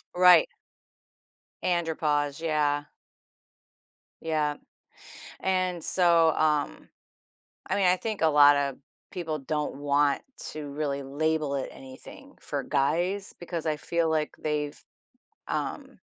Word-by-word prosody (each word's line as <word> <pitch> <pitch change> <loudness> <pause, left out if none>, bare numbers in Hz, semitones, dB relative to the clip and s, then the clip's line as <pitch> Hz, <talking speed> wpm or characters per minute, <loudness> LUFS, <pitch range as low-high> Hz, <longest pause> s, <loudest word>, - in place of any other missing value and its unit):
Right. 180 - +7 1.1
Andropause, 155 -4 0
yeah. 150 -2 +1 1.4
Yeah, 155 -2 0 0.9
and 185 -3 0
so, 170 -3 +4
um, 150 - 0 0.8
I - - +1
mean, 200 -2 +2
I 180 +1 +5
think 215 -1 -4
a 160 - +5
lotta 145 -2 +5 0.3
people 160 -4 -3
don't 150 +1 -2
want 145 0 +1 0.3
to 150 -1 -6
really 140 -1 -3
label 150 +1 -1
it 135 - -3
anything 130 -1 -11
for - - -3
guys 175 +8 0
because 170 -2 -5
I 155 - +1
feel 165 +2 0
like 155 -1 -1
they've, 150 -1 -2 0.7
um - - -3
155 Hz, 110 wpm, -27 LUFS, 145-170 Hz, 1.4 s, Right